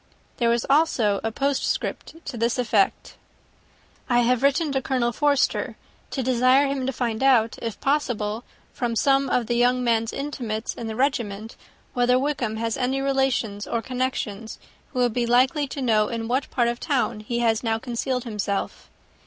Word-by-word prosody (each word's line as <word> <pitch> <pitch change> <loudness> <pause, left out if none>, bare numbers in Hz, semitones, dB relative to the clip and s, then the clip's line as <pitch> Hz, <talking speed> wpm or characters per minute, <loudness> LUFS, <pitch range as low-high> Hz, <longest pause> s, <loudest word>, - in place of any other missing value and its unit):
There 235 -1 +2
was 235 0 +1
also 255 -9 +2
a 225 - -1
postscript 280 +5 -2
to 280 - -5
this 235 +2 0
effect: 220 -5 0 0.9
"I 240 -1 +4
have 245 0 +2
written 285 +3 +2
to 270 -1 0
Colonel 250 -2 0
Forster 285 +2 +1 0.3
to 265 - -3
desire 255 +2 +4
him 275 -2 -2
to - - +1
find 240 -3 -2
out, 245 -5 +3
if 230 -2 -4
possible, 240 -6 -1 0.3
from 240 -2 -2
some 275 +2 +3
of 245 -1 +1
the 240 - -1
young 245 +1 +2
man's 230 -1 +1
intimates 240 -6 -4
in 230 - -6
the 220 - -4
regiment, 225 -5 -1 0.4
whether 245 0 +3
Wickham 255 -5 -1
has 225 0 -2
any 265 +1 0
relations 265 -7 0
or 230 -1 -2
connections 250 -4 -3 0.3
who 260 - -8
would 245 -2 +2
be 240 0 0
likely 260 +5 +3
to 270 0 -5
know 215 -3 +3
in 225 0 -4
what 260 +3 -1
part 240 -3 +1
of 240 0 -2
the - - -7
town 250 -6 0
he 225 +3 -4
has 230 -2 +2
now 225 -2 0
concealed 250 +1 -2
himself. 210 -4 -3
245 Hz, 175 wpm, -24 LUFS, 225-265 Hz, 0.9 s, I